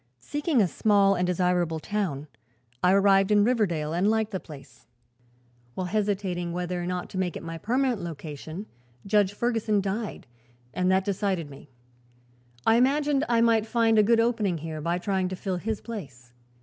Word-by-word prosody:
Seeking 290 - 0
a - - +2
small 200 +1 +3
and 180 -1 0
desirable 180 -2 +1
town, 170 -7 -3 0.6
I 180 - +4
arrived 195 0 +4
in 205 -1 +5
Riverdale 180 -10 0
and 180 +5 +2
liked 220 -1 0
the 190 - -2
place. 150 -6 -14 0.9
While 185 - -2
hesitating 195 -4 -1
whether 180 0 -3
or 175 - -4
not 180 -1 -3
to 185 - -4
make 180 -2 -1
it - - -10
my 165 0 -6
permanent 250 - 0
location, 160 +2 -7 0.4
Judge 200 -1 +3
Ferguson 225 -2 0
died, 205 +3 -4 0.5
and 185 0 +1
that 190 0 +2
decided 190 -6 -1
me. 140 +1 -13 1.0
I 225 - +5
imagined 285 +3 +2
I 235 -1 +3
might 225 -2 +3
find 225 -1 +3
a - - +8
good 225 +2 +3
opening 225 -6 +1
here 155 0 -6
by 170 +3 0
trying 190 0 -1
to 185 - -4
fill 185 0 -3
his 215 +3 -3
place. 135 - -9
195 Hz, 170 wpm, -26 LUFS, 175-220 Hz, 1.0 s, a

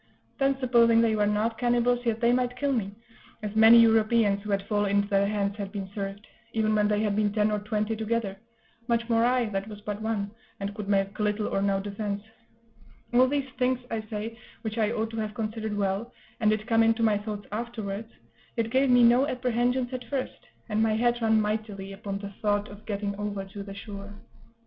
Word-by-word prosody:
Then, 275 -1 +2
supposing 235 -3 +4
they 225 -1 +3
were 210 -1 +2
not 215 +2 0
cannibals, 245 0 +2
yet 225 -1 0
they 235 0 +4
might 250 0 0
kill 285 +1 0
me, 215 -6 -1 0.5
as 210 0 -4
many 220 +1 +8
Europeans 220 -2 +4
who 210 - -8
had 200 -1 0
fallen 205 -1 0
into 200 0 +2
their 200 0 +3
hands 205 -1 -1
had 200 -2 -5
been 195 -2 -5
served, 200 +1 -5 0.3
even 215 -1 +1
when 210 -1 +3
they 210 0 +1
had 205 -2 0
been 210 -1 +2
ten 210 0 +2
or 210 - 0
twenty 210 +1 -1
together 220 -2 -2 0.5
much 235 -1 +1
more 230 0 +3
I, 250 0 +3
that 195 0 -3
was 210 -1 -8
but 205 0 -5
one, 215 -2 -2 0.3
and 200 0 -3
could 205 -1 -6
make 195 0 +1
little 210 0 0
or 195 - -1
no 195 -1 +1
defence; 200 0 -4 0.9
all 255 +2 +6
these 280 0 -1
things, 255 0 +2
I 225 - -1
say, 215 +1 -6 0.2
which 220 0 -3
I 215 -1 +2
ought 225 -1 -2
to 225 - -6
have 215 -1 -3
considered 220 -1 -3
well, 200 +4 -1 0.3
and 215 -3 +3
did 215 0 0
come 230 -1 +3
into 225 0 +3
my 210 -2 +3
thoughts 210 -1 -6
afterwards, 220 -1 -4 0.5
yet 230 -1 0
gave 265 +1 +3
me 245 -1 +6
no 245 +4 +5
apprehensions 250 0 0
at 250 -1 -5
first, 255 -1 -4 0.2
and 215 -1 0
my 220 -1 +2
head 240 +1 +1
ran 220 -1 +4
mightily 210 -2 -3
upon 195 0 -5
the 200 0 -7
thought 205 0 +1
of 205 +1 -13
getting 200 -1 -2
over 205 -1 -3
to 195 +1 -9
the 195 0 -8
shore. 200 0 -8
215 Hz, 210 wpm, -27 LUFS, 205-235 Hz, 0.9 s, many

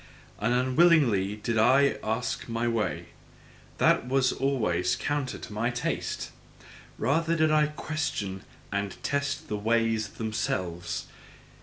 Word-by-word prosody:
And 105 +4 +1
unwillingly 130 - +4
only 100 +2 -3
did 110 +1 -1
I 135 +5 +4
ask 115 +2 -2
my 115 +1 -1
way 115 -2 -1 0.7
that - - +3
was 130 -1 +2
always 105 -10 +1
counter 145 -3 -2
to - - -9
my 115 +3 0
taste! 120 -1 -3 0.7
Rather 165 +7 +1
did 155 -1 +3
I 155 -1 +4
question 145 -11 -3 0.3
and 100 -1 -2
test 140 0 -1
the 105 - -2
ways 115 0 +1
themselves. 90 -6 -3
115 Hz, 125 wpm, -28 LUFS, 105-140 Hz, 0.7 s, unwillingly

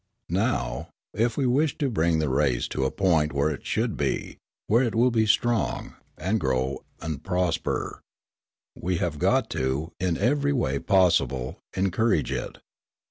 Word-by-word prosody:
Now, - - -1 0.2
if 115 +2 0
we 140 - +1
wish 140 +4 +2
to 145 - 0
bring 85 -8 +1
the 80 -1 0
race 65 -2 +1
to 65 - -1
a - - +2
point 80 -6 +2
where 70 +2 +1
it 70 - -7
should - - 0
be, - - -2 0.3
where 115 +4 +3
it 120 -4 0
will 120 +2 +4
be 110 -2 +2
strong, 120 +2 +1 0.2
and 95 +7 0
grow 65 -2 -1 0.2
and 80 -2 -4
prosper, 90 -3 -1 0.7
we 90 0 -1
have 80 -4 -2
got - - +2
to, 70 +6 -1
in 90 -2 0
every 145 +2 +2
way 70 - 0
possible, 70 -8 +2 0.2
encourage 95 - +1
it. - - -4
85 Hz, 155 wpm, -26 LUFS, 70-115 Hz, 0.7 s, will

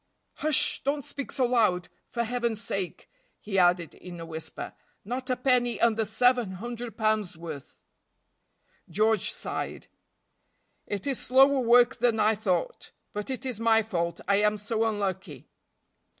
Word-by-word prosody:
"Hush! 305 -2 +3
don't 285 0 -1
speak 280 - -6
so 260 -3 +1
loud, 215 -8 +2 0.2
for 235 - -2
Heaven's 235 -2 -1
sake;" 195 -4 -4 0.3
he 195 -2 -1
added 175 -2 +3
in 175 -2 -10
a 165 - -6
whisper, 160 -1 -6 0.3
"not 250 +4 -4
a 255 - +2
penny 245 -2 +1
under 225 -1 +2
seven 235 -1 +2
hundred 235 +4 -6
pounds' 215 -5 0
worth." 160 -5 -9 1.1
George 215 +3 +2
sighed. - - -5 1.0
"It 200 -2 -4
is 275 -3 0
slower 270 +2 +5
work 245 +1 +5
than 235 -2 +2
I 215 +1 +4
thought; 190 -5 -2 0.2
but 210 +3 -5
it 260 0 -4
is 250 -5 -3
my 225 -1 +4
fault, 170 -5 -2
I 200 - +4
am 210 +1 +2
so 220 +2 -1
unlucky." 190 - -3
220 Hz, 145 wpm, -27 LUFS, 190-245 Hz, 1.1 s, slower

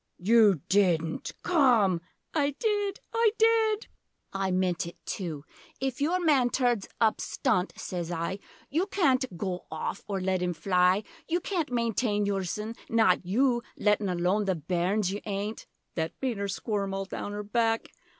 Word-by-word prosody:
You 205 -3 +5
didn't 175 -5 +1
Come! 240 - +4 0.3
I 285 -3 +1
did 410 -2 0
I 455 -2 +3
did! 445 -1 +3 0.5
I 195 0 -1
meant 180 -3 0
it 170 - -10
too. 160 -7 -4 0.3
'If 265 0 -2
your 340 +5 +2
man 285 -8 +3
turns 245 -6 +1
up 220 -1 +2
stunt,' 210 -8 0
sez 175 -2 -4
I, 170 +3 -2 0.3
'You 335 +7 +1
can't 260 - +1
goa 180 0 -2
off, 160 0 -4
or 200 -2 -2
let 185 -1 0
him 180 -1 -1
fly; 180 +3 +3 0.2
You 345 +2 +1
can't 340 -7 -2
maintain 230 -3 +1
yoursen 200 +2 -2 0.2
not 220 -6 +3
you! 240 +4 +2 0.2
Lettin' 210 -1 +2
aloan 180 +4 +1
the 190 -2 +1
bairns, 180 +5 0
you 205 - -4
'aint!' 205 +1 -4 0.3
(That 160 -1 -2
made 255 -5 -1
her 200 - -1
squirm 200 0 -2
all 195 0 -2
down 205 +1 -5
her 210 0 -4
back!) 225 +1 0
205 Hz, 155 wpm, -28 LUFS, 185-255 Hz, 0.5 s, You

